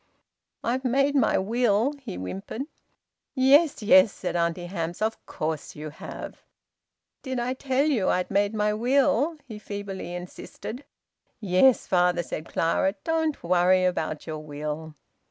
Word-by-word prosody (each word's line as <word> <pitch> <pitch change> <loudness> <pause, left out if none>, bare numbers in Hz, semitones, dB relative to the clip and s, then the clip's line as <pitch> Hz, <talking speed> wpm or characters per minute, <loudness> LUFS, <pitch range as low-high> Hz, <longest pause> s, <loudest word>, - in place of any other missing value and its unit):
"I've 255 +3 -1
made 275 +3 +2
my 270 -5 +3
will," 230 +4 +1
he 225 -8 -6
whimpered. 95 - -5 0.7
"Yes, 275 +1 +4
yes," 270 +1 +6
said 180 - -5
Auntie 170 +1 0
Hamps. 175 -2 -4
"Of 220 +1 -2
course 155 0 -4
you 150 0 -7
have!" 150 - -9 0.8
"Did 260 -2 -3
I 245 +2 -1
tell 265 +1 0
you 250 -11 +1
I'd 180 +2 0
made 200 +2 +1
my 210 0 +1
will?" 270 +6 +2
he 220 -5 -9
feebly 200 -4 -6
insisted. 200 +8 -8 0.5
"Yes, 215 +5 +4
father," 180 -1 +2
said 155 -1 -6
Clara. 180 +4 +1
"Don't 320 -2 -1
worry 180 +1 +3
about 160 -4 -2
your 155 -1 -5
will." 150 +1 -6
205 Hz, 135 wpm, -26 LUFS, 175-260 Hz, 0.8 s, yes